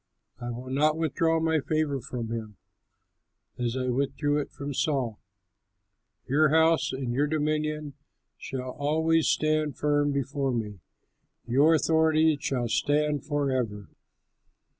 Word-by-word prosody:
I 120 -1 -5
will 125 +2 -6
not 150 +3 +2
withdraw 165 +1 +1
my 160 -1 +1
favor 150 -2 -1
from 115 -2 -5
him 110 -3 -5 1.0
as 120 +1 -1
I 130 0 -1
withdrew 140 +3 0
it 145 - -4
from 145 0 -6
Saul. 130 -7 -1 1.1
Your 150 +3 +3
house 160 +1 +3
and 130 -2 -3
your 145 +4 +1
dominion 150 -1 -1 0.4
shall 130 -1 -6
always 160 +3 +1
stand 155 -1 +1
firm 145 -1 +1
before 140 -1 -1
me; 105 -4 -4 0.7
your 145 +7 +4
authority 160 0 +3
shall 125 -4 -1
stand 145 +3 0
forever.'" 130 - -1
145 Hz, 120 wpm, -27 LUFS, 130-155 Hz, 1.1 s, your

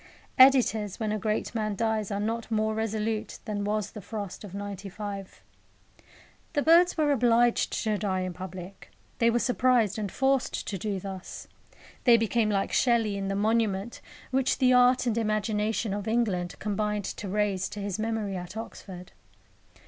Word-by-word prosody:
Editors, 240 -7 +5
when 215 -2 -1
a 215 - -1
great 215 0 -2
man 215 -3 -1
dies, 220 -1 -1
are 200 -1 -2
not 225 +2 -2
more 220 -1 +1
resolute 220 0 -2
than 210 -2 -3
was 210 0 -1
the 210 - -9
frost 205 -1 -6
of 195 -2 -9
'95. 200 0 -7 1.1
The 290 -2 +1
birds 340 +2 +5
were 300 -2 +2
obliged 240 -2 +3
to 215 -2 0
die 190 -3 -1
in 185 -1 -3
public. 185 +1 -9 0.3
They 230 - +4
were 235 - +2
surprised 240 -4 +2
and 205 -3 -3
forced 270 -1 0
to 195 - -3
do 200 0 -2
thus. 190 -1 -8 0.6
They 240 -2 +7
became 225 0 +1
like 195 -2 0
Shelley 230 -4 +2
in 195 0 -3
the 195 - -1
monument 215 0 0 0.3
which 265 0 +1
the 255 -1 +4
art 250 +1 +5
and 235 -3 +1
imagination 215 0 0
of 205 0 -4
England 210 -6 0
combined 210 0 -2
to 200 - -5
raise 200 -2 0
to 210 - -7
his 200 0 -3
memory 220 -3 -2
at 180 +3 -7
Oxford. 190 -5 -8
215 Hz, 165 wpm, -27 LUFS, 200-230 Hz, 1.1 s, They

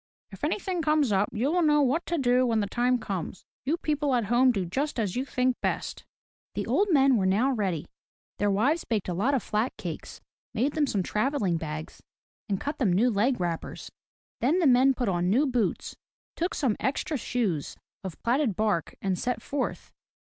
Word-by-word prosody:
" - - -53
If - - -12
any - - +1
thing 375 -4 -3
comes 305 -5 +2
up, 195 +1 +2
you 245 +7 0
will 355 +1 +2
know 295 -2 +4
what 285 +6 0
to 340 - 0
do 250 -2 +3
when 225 -2 +2
the 205 - +1
time 245 +4 +1
comes. 190 -5 -5 0.2
You 305 +5 +1
people 295 -4 0
at 235 -3 +1
home 255 +1 +5
do 195 -6 -1
just 270 - -2
as 205 -5 -1
you 255 - 0
think 255 -2 0
best." - - -3 0.5
The - - -2
old 410 - +2
men 275 -6 +5
were 190 -2 +1
now 220 +8 +2
ready. 190 - -1 0.5
Their 205 - +2
wives 260 +12 +2
baked 215 -5 -2
a - - -1
lot 235 +11 +1
of 255 - -1
flat 215 +4 -1
cakes, - - -7 0.4
made 260 +6 +1
them 300 -2 +1
some 200 -7 0
travelling 210 - 0
bags, 155 -1 -6 0.5
and 195 -2 0
cut 290 - -4
them 220 -9 +2
new 225 +8 +3
leg 230 +4 +1
wrappers. 170 -2 -4 0.5
Then 285 +9 +2
the 360 - +2
men 260 0 +5
put 245 - -1
on 175 -1 +1
new 255 +9 +3
boots, 245 -7 -1 0.4
took 345 +2 -2
some 245 -7 +1
extra 280 +3 -1
shoes 215 - -2 0.3
of 190 -4 -7
platted 240 -3 +1
bark, 210 -6 0
and 190 -2 0
set 250 0 -1
forth. 280 -2 -4
245 Hz, 200 wpm, -27 LUFS, 200-280 Hz, 0.5 s, home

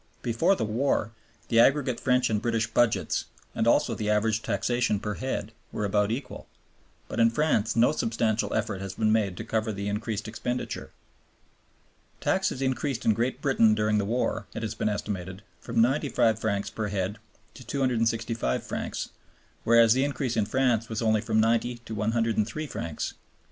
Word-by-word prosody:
Before 145 +11 +2
the 110 - -1
war 115 0 0 0.4
the 115 - +4
aggregate 130 0 +3
French 125 -2 +2
and 105 -1 +1
British 115 -1 +1
budgets, 115 0 +1 0.3
and 110 - 0
also 125 0 +3
the 105 -1 -2
average 105 +1 +2
taxation 115 +1 0
per 105 +1 -3
head, 110 -3 -3 0.2
were 105 - -2
about 105 0 +2
equal; 120 +5 -5 0.6
but - - -4
in 115 0 +6
France 115 -4 +1
no 115 +1 +5
substantial 115 -5 0
effort 105 -3 -1
has 95 -1 -6
been 110 -1 +2
made 105 -5 +1
to - - -4
cover 110 0 -1
the 100 0 -4
increased 105 +1 -3
expenditure. 120 +3 -4 1.3
"Taxes 190 -8 0
increased 130 -1 -1
in 110 - +5
Great 125 +5 -2
Britain 115 -6 +4
during 105 0 +2
the - - 0
war," 115 +5 -1
it 115 - -4
has 110 -1 -2
been 110 - -1
estimated, 95 -2 -4 0.2
"from 115 0 -2
95 125 -4 +2
francs 100 -2 -1
per 110 -1 -3
head 100 +1 -2 0.3
to 130 - -12
265 115 - 0
francs, - - -4 0.5
whereas 115 -1 +6
the 130 +1 +2
increase 140 -4 -1
in 105 -3 +1
France 125 -3 +1
was 110 +1 -2
only 110 -1 +3
from 110 0 +1
90 115 +2 +2
to 115 -1 -9
103 110 +4 0
francs." 80 - -4
115 Hz, 165 wpm, -27 LUFS, 105-120 Hz, 1.3 s, in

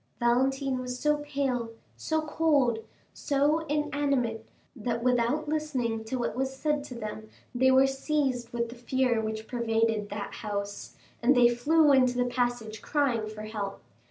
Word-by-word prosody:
Valentine 265 +2 +1
was 250 0 -4
so 300 +2 +2
pale, 275 -5 -2 0.3
so 315 0 -1
cold, 295 -7 +2 0.3
so 290 +2 +1
inanimate 280 -6 0 0.3
that 235 0 -3
without 250 +5 +1
listening 265 -8 -1
to 220 +4 -4
what 240 - -2
was 265 +1 -2
said 295 0 0
to 255 - -9
them 215 -1 -6 0.2
they 260 +1 +4
were 260 +1 +6
seized 270 -3 -1
with 235 -1 -2
the 235 - -9
fear 245 -1 +1
which 220 0 -4
pervaded 225 -3 0
that 205 0 -5
house, 205 -1 -5 0.3
and 255 +3 +4
they 245 -1 +7
flew 300 +5 +4
into 255 -2 +4
the 245 - +2
passage 245 -3 -2
crying 255 -7 0
for 215 0 -8
help. 210 -2 -5
250 Hz, 155 wpm, -28 LUFS, 230-280 Hz, 0.3 s, they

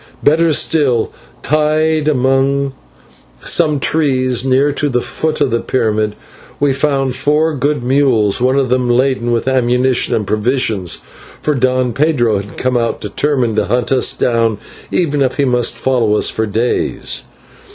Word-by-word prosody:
Better 160 +3 +3
still, 140 -6 +1 0.3
tied 155 +1 +1
among 135 0 +1 0.7
some 150 -2 +2
trees 130 -5 0
near 135 +2 +2
the 140 -3 -1
foot 155 +5 -3
of 140 -4 +2
the 115 - +1
pyramid, 110 -3 -1 0.4
we 145 -1 +2
found 135 -2 0
four 150 +4 +1
good 145 -1 -1
mules, 125 -6 +2
one 130 +2 +2
of 135 -2 +1
them 125 -1 +1
laden 125 -1 +1
with 120 +2 -1
ammunition 125 0 +1
and 105 - -1
provisions, 110 -4 -1 0.4
for 150 - 0
Don 130 -2 0
Pedro 130 -6 +1
had 100 0 -10
come 125 -1 0
out 115 -1 -1
determined 130 -7 -1
to - - +2
hunt 120 +3 -1
us 130 -1 +3
down, 115 -3 0 0.3
even 145 -5 0
if 130 -2 0
he 140 - +2
must 125 -2 +1
follow 120 -5 +1
us - - +1
for 110 0 -2
days. 115 +4 -1
130 Hz, 150 wpm, -15 LUFS, 120-145 Hz, 0.7 s, Better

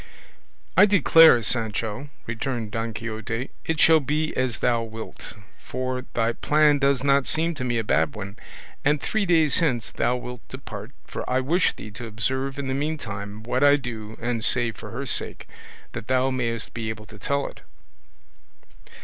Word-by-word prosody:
"I 205 - +8
declare, 165 - +7
Sancho," 115 +3 -2 0.2
returned 115 -1 -3
Don 115 +1 -2
Quixote, 115 +3 -4
"it 160 -1 -1
shall 160 -1 +7
be 150 +2 -1
as 130 -2 0
thou 120 -1 +1
wilt, 115 0 -8 0.3
for 130 0 -3
thy 115 0 +2
plan 150 +1 +3
does 140 -1 +2
not 140 -1 +3
seem 165 +2 +1
to 145 - -5
me 120 -2 0
a 115 - 0
bad 80 -7 +1
one, 100 +4 -7 0.4
and 145 +1 +3
three 200 - -1
days 160 -3 +4
hence 125 -9 0
thou 125 - +1
wilt 125 -1 -7
depart, 110 -5 -8 0.2
for - - -5
I 130 +1 +2
wish 165 +8 +2
thee 105 - -10
to 110 +4 -7
observe 130 +5 -1
in 140 -1 -3
the 130 - -1
meantime 110 -8 -4
what 120 - 0
I 145 0 +7
do 115 -5 -6
and 120 -1 -2
say 120 -2 +3
for 105 - -10
her - - -5
sake, - - -1 0.4
that 110 - -7
thou 130 +1 +2
mayest 115 -4 -2
be 110 -1 -3
able 110 -1 -6
to 105 0 -14
tell 140 +3 0
it." - - -8
125 Hz, 175 wpm, -25 LUFS, 115-140 Hz, 0.4 s, I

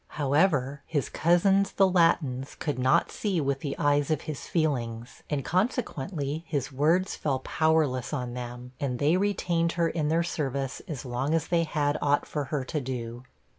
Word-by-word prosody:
However, 145 -2 +2
his 145 -4 -1
cousins, 195 +4 +3
the 195 - +4
Latins, 155 -7 +2
could 145 -4 -3
not 130 +1 +3
see 195 -5 -1
with 140 -2 0
the 140 0 -4
eyes 145 0 +2
of 155 -2 +1
his 155 -3 -6
feelings, 120 -8 -2
and 145 -3 -2
consequently 165 - -1
his 145 -3 -2
words 160 +8 +2
fell 140 -3 -1
powerless 150 -3 +1
on 125 -5 -3
them, 125 0 -7
and 130 -3 -1
they 150 +5 +3
retained 175 -4 +1
her 170 -1 +1
in 160 -2 -1
their 165 +2 +2
service 140 -5 -3
as 150 -5 -5
long 130 +5 -1
as 160 - -1
they 170 -1 +2
had 150 -2 0
aught 145 0 +2
for 150 -2 -3
her 140 0 -2
to 150 +3 -3
do. 120 -1 -5
145 Hz, 170 wpm, -27 LUFS, 130-165 Hz, -, the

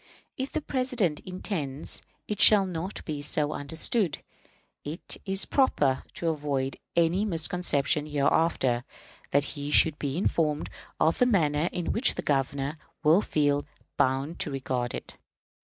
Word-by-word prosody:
"If 265 +1 -4
the 315 - -2
President 250 - 0
intends 160 -7 -5 0.3
it 210 - -2
shall 205 -2 +8
not 180 +1 -5
be 150 -3 -4
so 150 0 0
understood, 160 - -1 0.6
it 155 +5 -4
is 195 0 +2
proper, 145 - +2
to 170 - -1
avoid 145 -4 -2 0.2
any 170 +4 +3
misconception 160 -5 +2
hereafter, 140 -4 +1 0.5
that 140 0 +3
he 145 0 -5
should 150 0 +5
be 140 +1 -2
informed 155 -5 0 0.3
of 160 +1 +2
the 250 - +4
manner 160 -7 +2
in 175 -2 -2
which 240 - +3
the - - -4
Governor 140 +1 -1 0.3
will 160 +6 +5
feel 145 -5 +1 0.3
bound 135 +5 0
to - - -1
regard 130 -3 -2
it. - - -9
155 Hz, 140 wpm, -27 LUFS, 145-180 Hz, 0.6 s, shall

